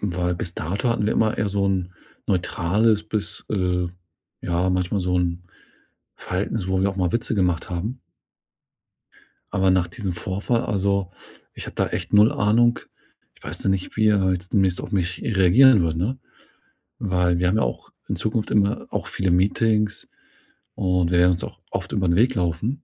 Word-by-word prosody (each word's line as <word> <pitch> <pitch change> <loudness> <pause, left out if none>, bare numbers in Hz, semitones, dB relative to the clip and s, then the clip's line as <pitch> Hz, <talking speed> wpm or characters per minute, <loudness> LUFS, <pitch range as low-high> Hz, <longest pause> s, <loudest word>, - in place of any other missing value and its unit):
weil 90 -2 -1
bis 85 0 -4
dato, 95 +10 -2
hatten 115 -3 0
wir - - +1
immer 110 -1 +1
eher 105 - +1
so 100 0 0
'n 95 -2 -1 0.3
neutrales 100 +4 +1
bis, 110 -1 -3
äh 90 -3 0 0.5
ja 90 +1 0
manchmal 90 +2 0
so 90 0 0
'n 90 0 -2 0.7
Verhalten 95 +5 -3
s 95 - -3
wo 95 0 +1
wir 100 +1 +2
auch 95 - -9
mal 90 -3 0
Witze 115 - -1
gemacht 90 -4 0
haben. 105 +9 -4 1.5
Aber 95 0 +2
nach 90 -2 +2
diesem 95 +1 -4
Vorfall 100 +6 -1
also, 100 -2 0 0.4
ich - - -7
habe - - -9
da - - +1
echt - - -5
0 105 +2 +6
Ahnung. 115 +3 +3 0.6
Ich - - -23
weiß - - -5
noch 95 - +3
nicht, 95 +1 -3
wie 110 0 +4
er 95 -3 +3
jetzt 90 0 -4
demnächst 95 -4 +2
auf - - -8
mich 90 -3 -1
reagieren 105 +2 +5
wird, 80 -1 -1
ne? 110 +10 -1 0.8
Weil 90 -3 +1
wir 90 - +2
haben 95 +4 +2
ja - - +2
auch - - -4 0.2
in - - -2
Zukunft 110 0 -2
immer 100 -1 +1
auch - - -3
viele 95 -2 -1
Meetings 105 +3 +1 0.7
und 90 -2 +1
wir 90 - +3
werden 90 +1 +5
uns 85 - -4
auch - - -8
oft - - -4
über 95 - 0
'n 85 - +3
Weg 125 +6 +3
laufen 90 - -2
95 Hz, 185 wpm, -23 LUFS, 90-105 Hz, 1.5 s, 0